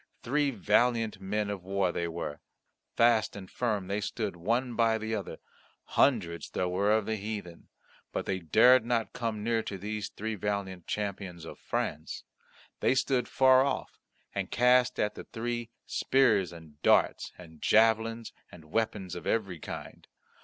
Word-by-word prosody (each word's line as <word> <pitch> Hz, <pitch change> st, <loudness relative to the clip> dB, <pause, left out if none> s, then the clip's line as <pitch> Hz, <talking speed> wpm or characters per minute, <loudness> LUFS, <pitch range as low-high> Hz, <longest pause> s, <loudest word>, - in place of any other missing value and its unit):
Three 145 Hz, +3 st, +1 dB
valiant 115 Hz, 0 st, +1 dB
men 105 Hz, +2 st, -1 dB
of 100 Hz, -3 st, -5 dB
war 95 Hz, -1 st, 0 dB
they 85 Hz, 0 st, -2 dB
were; 80 Hz, -3 st, -5 dB, 0.6 s
fast 115 Hz, -2 st, +3 dB
and 100 Hz, -2 st, -8 dB
firm 105 Hz, -3 st, -1 dB
they 100 Hz, +3 st, -2 dB
stood 105 Hz, -2 st, -3 dB
one 115 Hz, +8 st, -1 dB
by 115 Hz, -1 st, +3 dB
the 110 Hz, 0 st, -4 dB
other; 105 Hz, -3 st, -4 dB, 0.6 s
hundreds 95 Hz, -11 st, +2 dB
there 90 Hz, -, -1 dB
were 100 Hz, +3 st, +1 dB
of 110 Hz, -1 st, +2 dB
the 110 Hz, 0 st, -1 dB
heathen, 100 Hz, -5 st, -6 dB, 0.4 s
but -, -, -3 dB
they 95 Hz, -, -1 dB
dared 110 Hz, +9 st, +6 dB
not 115 Hz, -3 st, -1 dB
come 115 Hz, -4 st, -3 dB
near 115 Hz, 0 st, +1 dB
to 100 Hz, -, -5 dB
these 105 Hz, +2 st, -4 dB
three 110 Hz, +1 st, -4 dB
valiant 100 Hz, -3 st, -3 dB
champions 95 Hz, -5 st, -4 dB
of -, -, -10 dB
France. 80 Hz, +2 st, -3 dB, 0.6 s
They -, -, +3 dB
stood 130 Hz, -2 st, +1 dB
far 130 Hz, 0 st, +5 dB
off, 140 Hz, -, -3 dB, 0.3 s
and -, -, -3 dB
cast 125 Hz, +1 st, +3 dB
at 105 Hz, -, +1 dB
the -, -, -9 dB
three 120 Hz, 0 st, -4 dB, 0.2 s
spears 110 Hz, -10 st, +2 dB
and 80 Hz, -3 st, -14 dB
darts -, -, +3 dB
and 80 Hz, -3 st, -14 dB
javelins 115 Hz, +1 st, +3 dB, 0.2 s
and 80 Hz, -3 st, -14 dB
weapons 105 Hz, -5 st, -1 dB
of 90 Hz, -, -6 dB
every 100 Hz, -7 st, -1 dB
kind. -, -, -8 dB
105 Hz, 160 wpm, -30 LUFS, 95-115 Hz, 0.6 s, dared